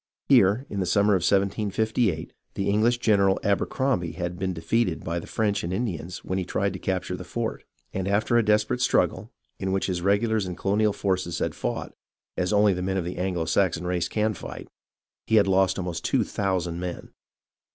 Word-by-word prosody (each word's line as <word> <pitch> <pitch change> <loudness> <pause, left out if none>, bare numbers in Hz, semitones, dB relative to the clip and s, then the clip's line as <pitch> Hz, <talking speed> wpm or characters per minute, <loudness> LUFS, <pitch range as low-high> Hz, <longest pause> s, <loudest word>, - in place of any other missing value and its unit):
Here, 105 +8 +5
in 100 - -4
the 95 - -1
summer 100 +3 +3
of 95 - +3
1758, 100 0 0 0.2
the 100 0 -1
EngHsh 115 +4 +2
general 100 -5 +3
Abercrombie 100 -3 0
had 90 0 -4
been 95 0 -1
defeated 90 +2 0
by 85 +1 -2
the - - -10
French 105 -2 0
and 85 - -3
Indians 90 -4 -4
when 95 +1 -1
he - - -1
tried 100 +2 -1
to 95 - -6
capture 95 0 -2
the - - -7
fort, - - -4 0.3
and 95 0 -2
after 105 +4 +1
a 120 - +6
desperate 105 +3 +2
struggle, 125 - +1 0.3
in 95 0 -2
which 95 0 0
his 90 -2 -2
regulars 100 +2 +1
and 90 - -5
colonial 105 +2 +2
forces 95 -4 -1
had - - -1
fought, - - -4 0.4
as 90 +2 -1
only 105 -1 +4
the 90 - -3
men 95 +1 -1
of 90 - -1
the 90 - -5
Anglo 90 -2 -1
Saxon 85 +1 +1
race 90 -1 0
can 110 0 0
fight, 85 - -8 0.6
he 110 - +3
had 105 - +6
lost 95 0 +2
almost 90 -3 -4
two - - +2
thousand 90 -4 -2
men. 90 -1 -6
95 Hz, 195 wpm, -25 LUFS, 90-105 Hz, 0.6 s, a